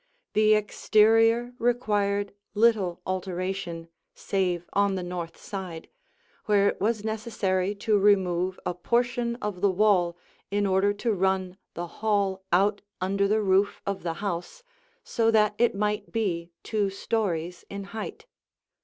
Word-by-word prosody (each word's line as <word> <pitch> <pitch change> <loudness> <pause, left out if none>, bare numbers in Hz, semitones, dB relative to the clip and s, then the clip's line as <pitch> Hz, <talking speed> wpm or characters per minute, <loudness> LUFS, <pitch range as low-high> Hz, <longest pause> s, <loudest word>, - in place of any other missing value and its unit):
The 215 0 +5
exterior 225 +3 +3
required 205 -4 0 0.2
little 205 -6 +2
alteration, 185 -2 -3 0.3
save 180 -3 -1
on 200 -1 +2
the 185 - -3
north 175 -2 -5
side, 185 -5 -7 0.6
where 200 -1 +4
it - - -1
was 215 0 0
necessary 210 -3 -1
to 205 +1 +1
remove 185 -2 +2
a - - -1
portion 235 +5 0
of 205 -4 -3
the 200 - +4
wall 185 -3 +2 0.3
in 205 0 0
order 195 +1 +3
to 215 +3 -1
run 190 -1 0 0.2
the 175 - -3 0.2
hall 200 -3 +1
out 200 +4 +3 0.2
under 200 +2 +1
the 215 +1 +2
roof 195 +1 +2
of 200 -1 -2
the 165 -2 -3
house 200 - -4 0.4
so 225 -1 +1
that 215 -2 +4
it 240 -3 +3
might 210 +1 -1
be 175 -7 -1
two 210 -3 0
stories 180 -4 -2
in 200 0 -5
height. 220 - -6
200 Hz, 135 wpm, -27 LUFS, 185-215 Hz, 0.6 s, The